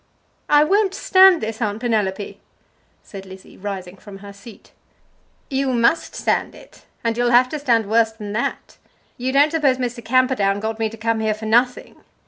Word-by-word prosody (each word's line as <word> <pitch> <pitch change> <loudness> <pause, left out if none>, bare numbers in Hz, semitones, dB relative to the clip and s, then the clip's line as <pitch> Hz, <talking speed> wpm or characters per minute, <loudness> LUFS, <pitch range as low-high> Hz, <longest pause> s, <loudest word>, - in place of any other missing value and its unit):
"I 295 0 +5
won't 390 +4 +1
stand 375 -2 +5
this, 220 +1 -5
Aunt 210 -1 -2
Penelope!" 210 -4 -2 0.6
said 195 -1 -11
Lizzie, 190 0 -13
rising 190 -2 -7
from 200 0 -12
her 200 0 -12
seat. 210 +3 -15 0.8
"You 270 0 -2
must 240 +7 +1
stand - - -1
it; - - -18 0.2
and 230 -1 -1
you'll 240 +1 +1
have 245 +1 +4
to 305 - -5
stand 235 -6 +1
worse 225 +1 +2
than 210 -2 -8
that. 230 - -4 0.4
You 255 +1 -2
don't 285 +3 +3
suppose 285 -5 +1
Mr. 245 -2 -4
Camperdown 250 -6 +1
got 220 +1 -4
me 220 -1 0
to 225 - -11
come 225 0 -1
here 220 -1 0
for 215 +1 -9
nothing. 240 +3 0
230 Hz, 175 wpm, -20 LUFS, 210-255 Hz, 0.8 s, I